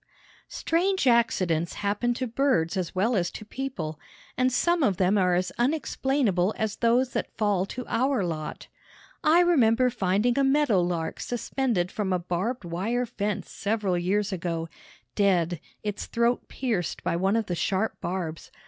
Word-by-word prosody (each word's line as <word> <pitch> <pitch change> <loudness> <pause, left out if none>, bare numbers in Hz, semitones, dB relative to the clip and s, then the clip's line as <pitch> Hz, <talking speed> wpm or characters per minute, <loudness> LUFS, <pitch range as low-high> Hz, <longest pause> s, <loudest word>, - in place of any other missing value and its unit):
Strange 370 +1 0
accidents 185 -9 +2
happen 205 +4 -1
to 250 +2 -2
birds 235 -9 +1
as 185 -2 -3
well 220 +6 +2
as 175 -3 +1
to 215 - -9
people, 195 - -5 0.4
and 255 +1 +2
some 345 +7 +2
of 200 -10 +2
them 190 +2 +3
are 180 -3 +3
as 185 +1 0
unexplainable 250 - +1
as 220 -2 -2
those 245 +2 +2
that - - -3
fall 205 -4 +1
to 250 +3 -6
our 260 -2 +1
lot. 155 -3 -4 0.6
I 330 +3 +6
remember 255 -8 +4
finding 220 +3 +1
a - - +4
meadow 270 -8 +3
lark 175 -2 -2
suspended 240 -6 -1
from 205 -3 -2
a 185 - +3
barbed 180 +6 -3
wire 210 +9 -1
fence 210 -4 -3
several 205 -3 -1
years 195 +4 0
ago, 165 -2 -3 0.4
dead, 175 -5 +2 0.2
its 210 -1 -4
throat 235 +1 0
pierced 220 - -2
by - - 0
one 190 +4 +1
of 225 -1 +1
the 180 - -3
sharp 190 +5 -1
barbs. 170 -3 -4
210 Hz, 155 wpm, -26 LUFS, 180-245 Hz, 0.6 s, I